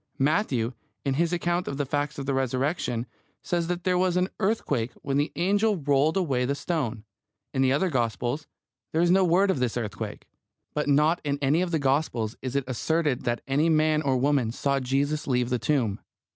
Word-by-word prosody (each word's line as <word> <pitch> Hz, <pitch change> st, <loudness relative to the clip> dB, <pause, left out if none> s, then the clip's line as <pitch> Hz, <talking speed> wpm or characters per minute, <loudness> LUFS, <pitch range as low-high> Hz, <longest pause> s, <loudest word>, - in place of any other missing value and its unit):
Matthew, 135 Hz, -, +1 dB, 0.3 s
in 135 Hz, -, +1 dB
his 170 Hz, +4 st, +1 dB
account 175 Hz, 0 st, 0 dB
of 140 Hz, -, -3 dB
the 145 Hz, -, 0 dB
fact 145 Hz, +2 st, -2 dB
of 140 Hz, -, -4 dB
the 135 Hz, -, 0 dB
Resurrection, 130 Hz, -1 st, -1 dB, 0.4 s
says 170 Hz, -1 st, -1 dB
that 175 Hz, 0 st, -2 dB
there 180 Hz, -1 st, +2 dB
was 180 Hz, -1 st, +2 dB
an 180 Hz, +1 st, +1 dB
earthquake 145 Hz, -, 0 dB
when 140 Hz, 0 st, 0 dB
the 145 Hz, +1 st, +1 dB
angel 205 Hz, +4 st, +2 dB
rolled 145 Hz, +2 st, +2 dB
away 140 Hz, -9 st, +1 dB
the 140 Hz, +3 st, 0 dB
stone. 135 Hz, -10 st, -2 dB, 0.5 s
In 135 Hz, -, +1 dB
the 130 Hz, -1 st, +4 dB
other 170 Hz, +6 st, +1 dB
Gospels 120 Hz, -, -1 dB, 0.5 s
there 160 Hz, -, +2 dB
is 175 Hz, -, +3 dB
no 190 Hz, +1 st, +5 dB
word 185 Hz, +3 st, +4 dB
of 155 Hz, -, -2 dB
this 125 Hz, -2 st, 0 dB
earthquake. 105 Hz, -4 st, -5 dB, 0.5 s
But 150 Hz, 0 st, -1 dB
not 150 Hz, +4 st, +3 dB
in 145 Hz, -1 st, -1 dB
any 145 Hz, +4 st, +2 dB
of 180 Hz, -, 0 dB
the 165 Hz, -, +1 dB
Gospels 135 Hz, -6 st, 0 dB
is 130 Hz, 0 st, -4 dB
it 140 Hz, -, +2 dB
asserted 140 Hz, +1 st, 0 dB
that 120 Hz, -1 st, 0 dB
any 145 Hz, +4 st, +2 dB
man 155 Hz, -1 st, +3 dB
or 135 Hz, -3 st, +1 dB
woman 135 Hz, -3 st, +2 dB
saw 140 Hz, +3 st, 0 dB
Jesus 140 Hz, +3 st, -1 dB
leave 125 Hz, -2 st, +1 dB
the 125 Hz, -, +1 dB
tomb. 115 Hz, -9 st, 0 dB
145 Hz, 200 wpm, -26 LUFS, 130-165 Hz, 0.5 s, no